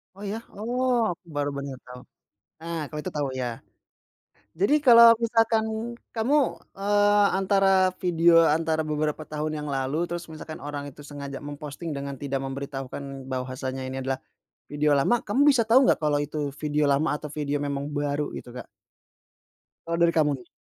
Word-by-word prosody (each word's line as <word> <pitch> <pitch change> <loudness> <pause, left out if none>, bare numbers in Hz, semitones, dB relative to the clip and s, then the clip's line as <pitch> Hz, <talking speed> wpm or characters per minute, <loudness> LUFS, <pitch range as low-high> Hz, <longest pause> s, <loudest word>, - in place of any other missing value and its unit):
Oh, 200 - -11
ya? 225 +3 -4
Oh! 240 +1 0
Aku 180 - -54
baru 145 0 0
bener, 140 -2 -5
tahu. 125 0 -10 0.6
Nah, 165 -2 -4
kalau 150 +1 -7
itu - - -4
tahu, 140 -2 -1
ya. 125 -3 -4 0.9
Jadi, 200 - +3
kalau 235 -1 +9
misalkan 225 -1 +2 0.5
kamu, 235 +7 +1 0.4
eee, 205 0 +4
antara 195 -1 +3
video 170 -1 +5
antara 160 +1 +1
beberapa 150 0 -2
tahun 155 0 -3
yang 150 - -5
lalu, 140 +5 -1
terus 175 0 -4
misalkan 155 -2 -9
orang 145 -1 -5
itu 145 +2 -14
sengaja 140 -1 -7
memposting 145 +3 -6
dengan 140 -1 -5
tidak 135 0 -3
memberitahukan 135 0 -6
bahwasanya 130 0 -4
ini 130 +1 -4
adalah 130 0 -2 0.5
video 150 +1 0
lama, 235 +12 +2
kamu 210 +7 -1
bisa 265 -5 +5
tahu 250 +4 +5
nggak - - +2
kalau 150 -1 +2
itu 145 -1 -3
video 150 0 0
lama 145 +4 +2
atau 150 0 -8
video 145 -1 -2
memang 140 0 -3
baru, 145 0 -2
gitu, 120 - -8
Kak? - - -9 1.2
Kalau 170 0 -1
dari 170 0 +4
kamu 150 -2 +3
nih? - - -19
150 Hz, 165 wpm, -26 LUFS, 140-190 Hz, 1.2 s, kalau